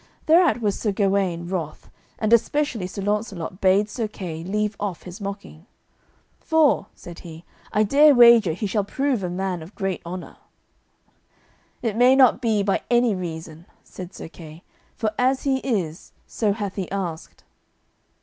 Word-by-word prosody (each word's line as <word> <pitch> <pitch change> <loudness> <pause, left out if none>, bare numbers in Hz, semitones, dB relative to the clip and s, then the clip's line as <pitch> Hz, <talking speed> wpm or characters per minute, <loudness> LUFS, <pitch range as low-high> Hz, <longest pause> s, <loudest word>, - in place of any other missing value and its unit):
Thereat 325 -5 +4
was 205 -3 -1
Sir 210 - 0
Gawaine 195 -4 0
wroth, 175 -5 -5 0.3
and 220 +1 +1
especially 235 -4 +1
Sir 195 +2 -6
Launcelot 200 -4 -3
bade 195 +2 +3
Sir 220 +1 -3
Kay 170 -6 -7
leave 210 +3 -1
off 200 -5 -4
his 180 +2 -10
mocking, 200 -3 -8 0.7
"for," 320 -3 +2
said 175 -1 -11
he, 165 -1 -11 0.3
"I 210 - +2
dare 285 +6 +5
wager 235 -7 +7
he 200 +6 -4
shall 205 +1 0
prove 265 +3 -1
a 180 - -2
man 180 -1 -3
of 165 +6 -12
great 195 -3 -3
honour." 180 +1 -8 1.5
"It 225 -3 -1
may 250 +3 +5
not 260 -2 +5
be 220 -4 +1
by 195 -1 0
any 240 -2 +3
reason," 165 -2 -7 0.2
said 180 -1 -10
Sir - - -9
Kay, 160 0 -13 0.3
"for 215 -2 -1
as 260 +1 +2
he 270 -2 +1
is, 190 - -3
so 210 -3 -1
hath 205 -2 -5
he 190 -3 -3
asked." 175 -5 -5
200 Hz, 160 wpm, -23 LUFS, 180-230 Hz, 1.5 s, wager